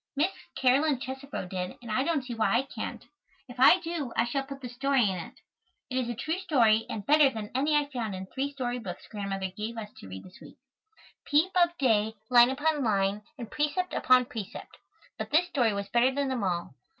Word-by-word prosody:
Miss 315 +7 +2 0.2
Caroline 270 +2 +3
Chesebro 265 -6 -6
did, 180 0 -4
and 235 -3 -8
I 215 - +2
don't 305 -2 0
see 250 -1 -6
why 225 0 +2
I 255 - +1
can't. 275 - -7 0.4
If 245 0 -11
I 270 +7 +8
do, 325 -7 -4
I - - +3
shall 270 +3 -1
put 275 0 -8
this 250 -2 -8
story 270 -2 +2
in 190 - -1
it. 170 - -8 0.5
It 255 - -1
is 245 -2 -2
a 240 - -3
true 320 +10 -2
story 230 - +3
and 205 -3 -5
better 295 0 +6
than 220 -4 -6
any 290 +4 +2
I 295 -1 +3
found 235 -8 -4
in 190 0 -6
three 270 +8 -3
story 250 -3 -3
books 230 - -7
Grandmother 195 -3 -4
gave 220 +3 -5
us 210 -2 -7
to - - -11
read 95 0 -8
this 185 - -15
week, - - -14 0.7
"Peep 310 +6 +3
of 345 -1 +3
Day," 220 -4 +2 0.2
"Line 240 0 +8
Upon 295 +2 0
Line," 200 -2 +1 0.2
and 235 -4 -8
"Precept 300 +5 -1
Upon 255 -1 +4
Precept," 230 -5 -8 0.4
but - - -4
this 320 +4 +4
story 245 -8 +2
was 200 -1 -3
better 240 +2 +4
than 280 0 -1
them 250 -5 -2
all. 175 -6 -2
250 Hz, 215 wpm, -28 LUFS, 215-285 Hz, 0.7 s, I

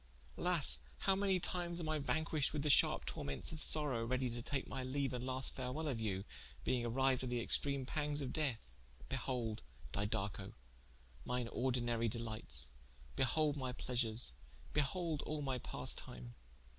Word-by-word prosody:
Alas, - - +4 0.2
how 195 - +4
many 195 -1 +2
times 175 -1 -2
am 165 - -3
I 155 -1 +1
vanquished 155 0 +1
with 150 -2 -1
the 150 - +4
sharpe - - +5
tormentes 70 -1 -1
of 155 -1 -4
sorowe, 145 -7 +5
readie 130 +1 0
to 120 0 -4
take 135 +2 -2
my 135 - -4
leaue 130 +1 -1
and 125 -1 -3
last 130 0 0
farewell 130 +5 -2
of 125 -6 -1
you, 100 -3 -1 0.4
being 125 -2 +1
arriued 130 +2 +2
to 130 - -3
the 120 0 0
extreme 140 +3 +1
panges 150 +1 -1
of 135 -3 -3
death. 130 - -1 0.4
Behold 115 -4 -1 0.3
Didaco 100 +1 -2 0.7
mine 125 -1 -1
ordinary 120 -2 +1
delites, 110 - 0 0.5
behold 145 +3 +3
my 130 -2 -2
pleasures, 120 - 0 0.4
behold 155 +2 +1
all 150 -1 -2
my 130 -2 -1
pastime. - - -5
130 Hz, 155 wpm, -38 LUFS, 115-150 Hz, 0.7 s, sharpe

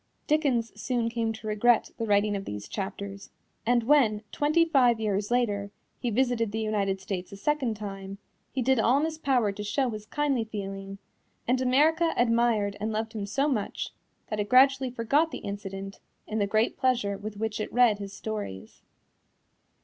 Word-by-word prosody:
Dickens 275 -7 +1
soon 240 -3 0
came 230 -1 -1
to 220 0 -9
regret 215 +2 +3
the 225 - -1
writing 205 0 +3
of 195 0 -4
these 105 0 -6
chapters, 195 - -6 0.4
and 240 -1 +3
when, 230 -5 +3
twenty 310 +3 +3
five 255 -8 +4
years 205 -2 -1
later, 210 -5 0 0.3
he 245 - -1
visited 235 -2 +1
the 220 - -2
United 205 -3 0
States 190 -1 -5
a 200 - -8
second 260 0 0
time, 195 -2 -7 0.3
he 260 - -1
did 265 0 +3
all 240 +4 +4
in 295 - +2
his 320 -1 -4
power 250 -8 +2
to 205 +1 -6
show 250 +4 0
his 215 -1 -7
kindly 280 -2 0
feeling, 195 -2 -6 0.5
and 255 +2 +2
America 310 +6 +3
admired 230 -4 +2
and 215 +2 -2
loved 220 +1 -3
him 205 -3 -4
so 275 +8 +1
much 225 -9 -2 0.4
that 215 - -2
it 205 0 -2
gradually 265 +1 +5
forgot 255 +7 +1
the - - -6
incident 195 -1 -6 0.3
in 215 +1 -3
the 200 - +1
great 215 +3 +1
pleasure 240 -6 +1
with 205 +1 -7
which 220 0 -2
it 215 - -3
read 235 -4 +4
his 200 -1 -6
stories. 205 - -6
220 Hz, 180 wpm, -28 LUFS, 200-255 Hz, 0.5 s, gradually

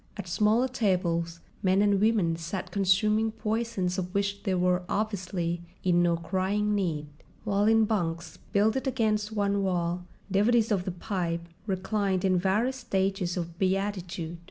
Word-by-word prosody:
At 200 -3 -6
smaller 215 +7 +3
tables 175 -8 0 0.2
men 190 0 +3
and 200 -1 +3
women 210 -7 +3
sat 175 +3 -5
consuming 210 +3 +2
poisons 215 -5 -1
of 180 0 -5
which 200 0 0
they 190 -3 0
were 180 0 +2
obviously 185 -5 -2 0.2
in 175 -1 +3
no 170 -1 +2
crying 190 +4 0
need; 170 -7 -1 0.4
while 205 -1 +1
in 225 0 +5
bunks 170 -6 -2
builded 220 +7 +2
against 215 -4 0
one 200 -1 0
wall 180 -1 -1 0.2
devotees 220 +3 +3
of 190 -3 +1
the 185 - -2
pipe 170 -3 -3 0.2
reclined 195 -1 0
in 185 -1 +3
various 215 +8 +1
stages 195 -6 -1
of 170 -1 -5
beatitude. 185 -3 -2
195 Hz, 145 wpm, -28 LUFS, 175-210 Hz, 0.4 s, in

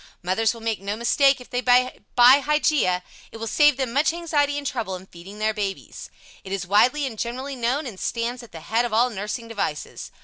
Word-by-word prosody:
Mothers 220 +6 +1
will 230 - -11
make 225 -3 -2
no 200 +1 -3
mistake 270 +4 +3
if 250 - -14
they 245 - -1
buy 250 +1 +3 0.2
the 250 +3 +8
Hygeia. 290 - +1 0.3
It - - -9
will 225 - -5
save 295 +4 +4
them 260 -4 -2
much 290 +4 +3
anxiety 300 -4 0
and 290 - -5
trouble 225 -8 -3
in 185 +1 -10
feeding 190 +3 -13
their 215 +1 0
babies. 200 -2 -5 0.3
It 190 - -9
is 195 -1 -3
widely 250 +10 +3
and 225 -5 -6
generally 260 +4 -4
known, 250 +5 -1
and 215 -7 -8
stands 240 +2 -3
at 235 - -14
the 165 - -10
head 225 +8 0
of 240 -3 -3
all 240 +3 +3
nursing 210 +3 -5
devices. 205 -10 -4
235 Hz, 215 wpm, -23 LUFS, 210-265 Hz, 0.3 s, the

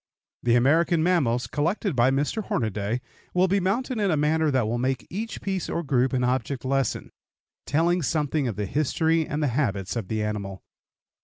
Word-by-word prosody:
The 120 -1 +3
American 160 +6 +3
mammals, 140 -9 +2
collected 170 +3 -1
by 120 +1 +4
Mr. 145 +11 0
Hornaday, 110 +2 -1 0.3
will 180 +1 +4
be 200 +2 +2
mounted 230 +6 -1
in 200 -2 +2
a 160 - +2
manner 155 +1 +2
that 130 -5 +2
will 120 +2 -1
make 130 0 -1
each 215 +5 -4
piece 190 -3 -2
or 170 - -2
group 130 -3 +1
an 130 -2 0
object 130 +1 -1
lesson, 135 -2 -1 0.6
telling 170 +4 +2
something 150 -2 0
of 115 - -3
the 105 +1 -2
history 160 - +1
and 150 +1 -2
the 145 - +2
habits 105 -9 -1
of 115 -5 -3
the 110 +1 -1
animal. 100 -3 -4
140 Hz, 180 wpm, -25 LUFS, 120-170 Hz, 0.6 s, by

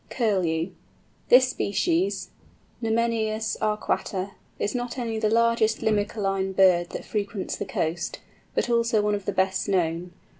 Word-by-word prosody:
CURLEW. 185 -7 0 0.6
This 255 +1 +7
species, 335 - 0 0.5
(Numenius 225 -1 0
arquata), 210 -2 -1 0.3
is 205 - -1
not 245 0 -3
only 230 -3 -2
the 215 -1 +2
largest 230 -1 +2
Limicoline 205 -3 0
bird 180 -3 +5
that - - -6
frequents 205 -2 -3
the - - -3
coast, 170 -2 -2 0.4
but - - +1
also 235 -2 +2
one 210 0 +1
of 200 -2 -3
the - - 0
best 190 +1 0
known. 175 -2 0
210 Hz, 135 wpm, -25 LUFS, 190-230 Hz, 0.6 s, This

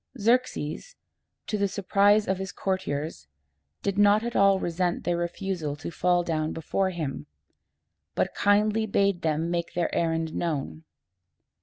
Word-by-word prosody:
Xerxes, 245 - 0 0.5
to 210 - -2
the 200 - +2
surprise 200 +2 +3
of 190 0 0
his 190 -1 -4
courtiers 150 - -3 0.6
did 200 0 -1
not 205 +1 +5
at 235 0 -4
all 195 -1 +5
resent 175 0 -1
their 175 -1 0
refusal 175 -3 -3
to 155 +3 -7
fall 175 +1 +2
down 155 -2 -1
before 190 +4 -1
him, 155 - -4 0.9
but - - 0
kindly 210 +2 +2
bade 200 -3 +1
them 160 +1 0
make 170 -1 -2
their 175 -1 0
errand 165 -1 0
known. 160 -1 -3
180 Hz, 140 wpm, -26 LUFS, 165-200 Hz, 0.9 s, not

